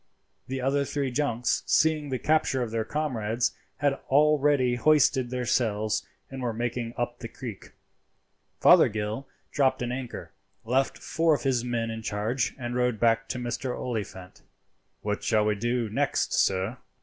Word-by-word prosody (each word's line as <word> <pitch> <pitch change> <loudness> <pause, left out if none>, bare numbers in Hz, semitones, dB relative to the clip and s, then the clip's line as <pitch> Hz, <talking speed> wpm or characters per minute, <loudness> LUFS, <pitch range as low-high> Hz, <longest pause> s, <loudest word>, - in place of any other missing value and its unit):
The 130 0 -3
other 140 +2 +1
three 140 -1 -2
junks, 125 -3 0
seeing 155 -2 +2
the 130 - -1
capture 150 -3 +1
of 115 - -5
their 115 -1 0
comrades, 120 -5 -1 0.3
had 140 -1 +1
already 145 -3 +4
hoisted 130 -1 +3
their 125 0 -3
sails, 110 -3 0 0.2
and 135 -1 -6
were 120 -2 -1
making 120 0 -3
up 120 0 -3
the 115 - -6
creek. 115 -3 -9 0.9
Fothergill 110 +5 +4 0.2
dropped 130 -3 +2
an 120 - -2
anchor, 125 -4 -6 0.3
left 130 +4 +1
four 165 -1 +1
of - - -6
his 130 -4 +1
men 115 -2 -2
in 115 0 -5
charge, 110 +3 -1
and 120 -2 -4
rowed 125 -3 +1
back 115 -1 +2
to - - -2
Mr. 125 +1 -3
Oliphant. 100 -6 -5 0.6
"What 105 0 -2
shall 110 -2 +2
we 105 - +2
do 120 +2 -1
next, 105 - 0
sir?" 95 +5 +1
125 Hz, 155 wpm, -27 LUFS, 115-135 Hz, 0.9 s, already